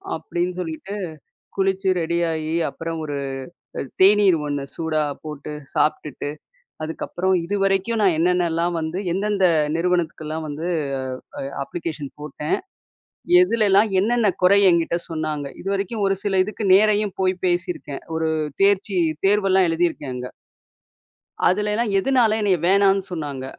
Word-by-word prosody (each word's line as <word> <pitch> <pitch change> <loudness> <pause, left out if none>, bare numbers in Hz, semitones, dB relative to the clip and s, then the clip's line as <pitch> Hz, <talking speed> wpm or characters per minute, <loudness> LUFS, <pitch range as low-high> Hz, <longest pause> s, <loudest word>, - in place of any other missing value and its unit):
அப்பிடின்னு 175 +3 -3
சொல்லிட்டு 170 +4 -6 0.6
குளிச்சு 195 0 +1
ரெடியாயி, 165 -1 -1 0.2
அப்பறம் 165 0 -5
ஒரு 145 - -4 0.6
அ - - -1 0.2
தேநீர் 195 -2 +6
ஒண்ணு 145 -1 -2
சூடா 160 -2 0 0.2
போட்டு 150 -1 -7 0.2
சாப்பிட்டுட்டு, 150 -2 -1 0.5
அதுக்கப்பறம் 180 +4 -1
இதுவரைக்கும் 195 +3 +1
நான் 185 -5 +3
என்னென்னலாம் 175 0 +1
வந்து, 160 +3 -3
எந்தெந்த 200 0 +1 0.3
நிறுவனத்துக்கெல்லாம் 160 -2 -1
வந்து 150 +3 -5 0.7
அ - - -4 0.2
அப்ளிகேஷன் 150 -1 -5
போட்டேன், 150 0 -2 0.9
எதுலலாம் 215 - +4
என்னென்ன 230 0 +2
குறை 200 +2 +6
என்கிட்ட 170 0 +1
சொன்னாங்க, 155 -3 -3
இதுவரைக்கும் 200 +3 -2
ஒரு 195 0 +1
சில 195 -2 +1
இதுக்கு 215 +1 -4
நேரையும் 210 0 +3
போய் 185 0 +2
பேசியிருக்கேன். 175 -5 -3
ஒரு 160 0 0 0.3
தேர்ச்சி 200 -1 +2 0.3
தேர்வெல்லாம் 195 -2 +3
எழுதியிருக்கேன் 165 -5 -1
அங்க, 125 0 -5 1.2
அதுலெல்லாம் 210 +4 0
எதனால 230 -1 +3
என்னைய 195 -4 +2
வேணானு 195 0 +4
சொன்னாங்க, 145 -6 -5
180 Hz, 115 wpm, -22 LUFS, 160-200 Hz, 1.2 s, தேநீர்